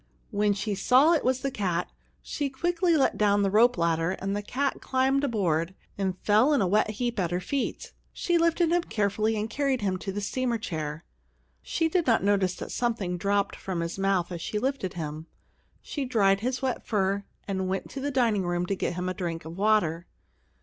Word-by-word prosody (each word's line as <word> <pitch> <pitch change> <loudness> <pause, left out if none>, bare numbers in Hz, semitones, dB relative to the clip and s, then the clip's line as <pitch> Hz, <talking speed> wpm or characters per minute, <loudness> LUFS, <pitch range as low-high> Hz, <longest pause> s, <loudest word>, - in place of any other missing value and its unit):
When 205 0 +2
she 200 +1 -2
saw 255 - +5
it 320 - +1
was 260 +1 +1
the 275 +1 -1
cat, 180 -6 -2 0.3
she 285 -2 -2
quickly 345 +4 +1
let 275 - +2
down 205 -1 +3
the 195 - +1
rope 235 +3 +5
ladder, 165 0 +1
and 195 +1 -3
the 205 - -2
cat 270 +6 -2
climbed 265 +1 +1
aboard, 185 - 0 0.2
and 190 -2 -2
fell 220 +8 +4
in 285 - +3
a - - +3
wet 210 +3 +2
heap 235 +1 -2
at 175 -3 +1
her 175 +1 -1
feet. 265 +9 -3 0.2
She 345 -3 0
lifted 335 0 +2
him 350 0 +3
carefully 215 -4 0
and 215 - -2
carried 270 +1 0
him 190 -2 0
to 195 +1 -5
the 200 - -3
steamer 240 +3 -1
chair. 160 -6 -5 0.6
She 325 - 0
did 340 -1 0
not 230 -5 +3
notice 195 -2 +2
that - - -7
something 225 -7 -1
dropped 200 +2 0
from 185 -3 -4
his 170 +3 -4
mouth 195 -2 +1
as 170 -2 -5
she 210 - -3
lifted 250 -6 -2
him. 155 -1 -5 0.6
She 285 - -4
dried 200 -6 +3
his 250 +4 -2
wet 255 -2 -1
fur, 200 -2 0 0.2
and 190 -2 -1
went 190 +1 -3
to 275 - -5
the 285 - -1
dining 235 -7 +2
room 175 -1 -1
to 195 - -1
get 175 - -2
him 180 +1 -3
a 185 - -1
drink 170 -3 -4
of 165 +1 -7
water. 190 -5 +1
205 Hz, 205 wpm, -27 LUFS, 185-255 Hz, 0.6 s, saw